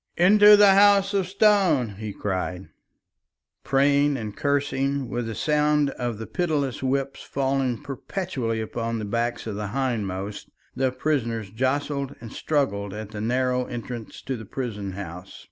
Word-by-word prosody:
"Into 205 Hz, +3 st, +7 dB
the 205 Hz, -1 st, +7 dB
House 200 Hz, 0 st, +5 dB
of 195 Hz, -2 st, +1 dB
Stone!" 195 Hz, -, +3 dB
he 110 Hz, -1 st, -4 dB
cried. 95 Hz, -2 st, -4 dB, 0.9 s
Praying 140 Hz, +1 st, +3 dB
and 105 Hz, -4 st, -6 dB
cursing, 140 Hz, -1 st, 0 dB
with 120 Hz, -1 st, -3 dB
the 115 Hz, -, -5 dB
sound 150 Hz, -1 st, +2 dB
of 120 Hz, -4 st, -4 dB
the 110 Hz, -, -6 dB
pitiless 150 Hz, -7 st, -1 dB
whips 135 Hz, +1 st, -1 dB
falling 135 Hz, -2 st, -1 dB
perpetually 135 Hz, -, -3 dB
upon 115 Hz, +1 st, -3 dB
the 110 Hz, -, -4 dB
backs 120 Hz, +3 st, -2 dB
of 110 Hz, -, -4 dB
the 105 Hz, 0 st, -4 dB
hindmost, 105 Hz, -5 st, -3 dB, 0.3 s
the 130 Hz, 0 st, +1 dB
prisoners 115 Hz, -8 st, -2 dB
jostled 140 Hz, +3 st, -1 dB
and 115 Hz, -1 st, -10 dB
struggled 100 Hz, -10 st, -1 dB
at 105 Hz, -1 st, -7 dB
the 105 Hz, -2 st, -6 dB
narrow 125 Hz, +2 st, 0 dB
entrance 120 Hz, -2 st, -7 dB
to 130 Hz, -, -3 dB
the 110 Hz, -, -8 dB
prison 105 Hz, -5 st, -5 dB
house. 90 Hz, -1 st, -8 dB
130 Hz, 145 wpm, -25 LUFS, 110-145 Hz, 0.9 s, Into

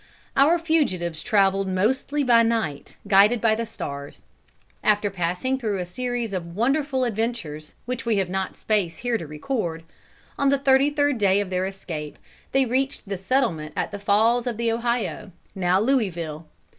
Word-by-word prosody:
Our 300 Hz, +6 st, +5 dB
fugitives 185 Hz, -, 0 dB
traveled 195 Hz, -3 st, +2 dB
mostly 260 Hz, +10 st, 0 dB
by 240 Hz, -3 st, +5 dB
night, 225 Hz, -11 st, -1 dB
guided 205 Hz, +4 st, +5 dB
by 220 Hz, 0 st, +3 dB
the 230 Hz, +1 st, -2 dB
stars. 140 Hz, -9 st, -7 dB, 0.6 s
After 205 Hz, -1 st, +2 dB
passing 180 Hz, +9 st, -1 dB
through 215 Hz, -5 st, -1 dB
a 180 Hz, -, -3 dB
series 240 Hz, +3 st, -3 dB
of 170 Hz, -2 st, -5 dB
wonderful 270 Hz, +4 st, +1 dB
adventures, 220 Hz, -10 st, -3 dB
which 250 Hz, 0 st, -4 dB
we 230 Hz, -3 st, +1 dB
have 190 Hz, -2 st, +1 dB
not 190 Hz, +1 st, -3 dB
space 190 Hz, -7 st, 0 dB
here 240 Hz, -2 st, +1 dB
to 165 Hz, -, -7 dB
record, 165 Hz, -, -3 dB, 0.6 s
on 280 Hz, -, +3 dB
the 280 Hz, -, +3 dB
thirty 270 Hz, +1 st, +4 dB
third 290 Hz, -3 st, +1 dB
day 195 Hz, -1 st, +3 dB
of 200 Hz, -2 st, -3 dB
their 185 Hz, +1 st, 0 dB
escape, 165 Hz, -6 st, -7 dB, 0.3 s
they 270 Hz, 0 st, +3 dB
reached 265 Hz, 0 st, -1 dB
the 200 Hz, -, -1 dB
settlement 190 Hz, -, 0 dB
at -, -, -2 dB
the 205 Hz, -, -6 dB
Falls 225 Hz, +5 st, +2 dB
of 235 Hz, -3 st, -2 dB
the 235 Hz, 0 st, +1 dB
Ohio, 235 Hz, -2 st, -2 dB, 0.2 s
now 185 Hz, 0 st, +2 dB
Louisville. 175 Hz, -, -1 dB
215 Hz, 165 wpm, -24 LUFS, 185-250 Hz, 0.6 s, Our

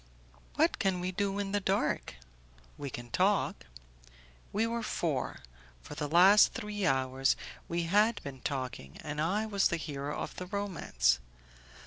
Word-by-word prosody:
"What -, -, +2 dB
can 190 Hz, -2 st, +1 dB
we 180 Hz, +1 st, -2 dB
do 200 Hz, +1 st, -1 dB
in 200 Hz, -1 st, -2 dB
the 205 Hz, -, +2 dB
dark?" 195 Hz, -, 0 dB, 0.6 s
"We 145 Hz, -1 st, -5 dB
can 120 Hz, -1 st, -8 dB
talk." -, -, +1 dB, 0.8 s
We 215 Hz, +3 st, +1 dB
were 230 Hz, 0 st, -2 dB
four; 165 Hz, -9 st, -2 dB, 0.4 s
for -, -, -8 dB
the 150 Hz, 0 st, -3 dB
last 185 Hz, +7 st, +6 dB
three 210 Hz, -5 st, -2 dB
hours 130 Hz, 0 st, +2 dB, 0.3 s
we 170 Hz, 0 st, -1 dB
had 210 Hz, +6 st, +3 dB
been 135 Hz, -2 st, -7 dB
talking, 130 Hz, -, -4 dB
and 150 Hz, -1 st, -3 dB
I 200 Hz, +7 st, +1 dB
was 200 Hz, -3 st, +2 dB
the 170 Hz, -, -1 dB
hero 145 Hz, -2 st, -4 dB
of -, -, -5 dB
the 180 Hz, -, -5 dB
romance. 170 Hz, -, +1 dB
175 Hz, 150 wpm, -31 LUFS, 140-205 Hz, 0.8 s, last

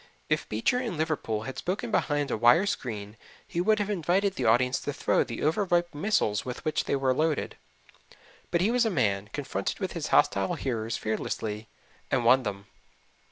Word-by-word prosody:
If -, -, 0 dB
Beecher 115 Hz, -, +1 dB
in 230 Hz, -9 st, -3 dB
Liverpool 150 Hz, -9 st, -1 dB
had 130 Hz, +3 st, -6 dB
spoken 210 Hz, +6 st, -3 dB
behind 145 Hz, -7 st, 0 dB
a -, -, +1 dB
wire 120 Hz, -, +5 dB
screen 110 Hz, -, -4 dB, 0.3 s
he 170 Hz, -, -2 dB
would 215 Hz, +3 st, +3 dB
have 205 Hz, 0 st, -1 dB
invited 190 Hz, +2 st, +1 dB
the 130 Hz, -, -3 dB
audience 125 Hz, +3 st, +3 dB
to 145 Hz, -, -4 dB
throw -, -, +2 dB
the -, -, -6 dB
over 165 Hz, +7 st, +2 dB
ripe 175 Hz, -2 st, +1 dB
missiles 145 Hz, -, +1 dB
with 125 Hz, +5 st, -7 dB
which 155 Hz, -1 st, 0 dB
they -, -, 0 dB
were 135 Hz, -1 st, +2 dB
loaded; 155 Hz, +2 st, 0 dB, 0.9 s
but 170 Hz, -, +1 dB
he 205 Hz, +5 st, +3 dB
was 250 Hz, 0 st, +3 dB
a 225 Hz, -, +2 dB
man, 105 Hz, -, 0 dB
confronted 115 Hz, -9 st, -3 dB
his -, -, -4 dB
hostile 95 Hz, -1 st, +3 dB
hearers 115 Hz, -4 st, -2 dB
fearlessly 110 Hz, 0 st, -3 dB, 0.4 s
and 125 Hz, -3 st, +1 dB
won 130 Hz, +3 st, +6 dB
them. 100 Hz, -4 st, -5 dB
140 Hz, 180 wpm, -28 LUFS, 110-175 Hz, 0.9 s, won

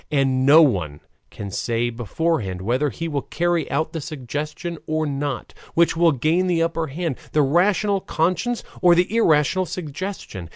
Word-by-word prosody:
And 135 Hz, -3 st, +1 dB
no 155 Hz, +3 st, +8 dB
one 90 Hz, -, 0 dB, 0.3 s
can 100 Hz, -1 st, -7 dB
say 120 Hz, +4 st, -1 dB
beforehand 115 Hz, -, -2 dB
whether 130 Hz, +8 st, +1 dB
he 165 Hz, +4 st, -5 dB
will 145 Hz, -3 st, -2 dB
carry 175 Hz, 0 st, -1 dB
out 155 Hz, +3 st, -1 dB
the 165 Hz, -, -3 dB
suggestion 155 Hz, +3 st, -5 dB
or 155 Hz, 0 st, 0 dB
not; 140 Hz, -2 st, -3 dB, 0.2 s
which 170 Hz, 0 st, +3 dB
will 165 Hz, 0 st, +4 dB
gain 155 Hz, +7 st, +1 dB
the 170 Hz, -2 st, +2 dB
upper 165 Hz, -1 st, -1 dB
hand, 155 Hz, -1 st, -3 dB, 0.2 s
the 150 Hz, -, +4 dB
rational 195 Hz, +7 st, +2 dB
conscience 185 Hz, +10 st, -1 dB, 0.2 s
or 175 Hz, -1 st, +6 dB
the 180 Hz, +5 st, +1 dB
irrational 175 Hz, -, +3 dB
suggestion. 155 Hz, -, -6 dB
155 Hz, 160 wpm, -22 LUFS, 135-170 Hz, 0.3 s, no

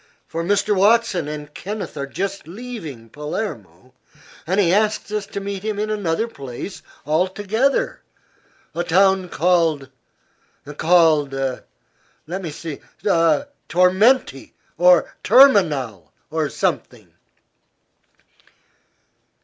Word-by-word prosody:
For 165 Hz, +1 st, -4 dB
Mr. 205 Hz, +3 st, +1 dB
Watson 200 Hz, -4 st, +3 dB
and 150 Hz, -1 st, -7 dB
Kenneth 205 Hz, +2 st, -6 dB
are 140 Hz, -, -4 dB
just 195 Hz, +4 st, -4 dB
leaving 175 Hz, -, -8 dB
Palermo, 130 Hz, -, -6 dB, 0.5 s
and 190 Hz, +4 st, +1 dB
he 180 Hz, -3 st, +3 dB
asks 215 Hz, +1 st, +1 dB
us 210 Hz, -1 st, -3 dB
to 200 Hz, -, -5 dB
meet 200 Hz, -1 st, -5 dB
him 215 Hz, 0 st, -3 dB
in 215 Hz, +1 st, -2 dB
another 205 Hz, 0 st, -1 dB
place 140 Hz, -, -8 dB, 0.2 s
altogether, 195 Hz, -, 0 dB, 0.7 s
a 175 Hz, -, -2 dB
town 190 Hz, +1 st, +3 dB
called 160 Hz, -5 st, +1 dB, 0.9 s
called 160 Hz, -4 st, +3 dB, 0.9 s
let 180 Hz, +5 st, -5 dB
me 170 Hz, -, -5 dB
see; 155 Hz, 0 st, -7 dB, 0.3 s
Tormenti, 185 Hz, -, +2 dB, 0.2 s
or 180 Hz, 0 st, +4 dB
Terminal, 145 Hz, -, +4 dB, 0.2 s
or 155 Hz, -2 st, -1 dB
something." -, -, -3 dB
180 Hz, 100 wpm, -21 LUFS, 150-205 Hz, 0.9 s, or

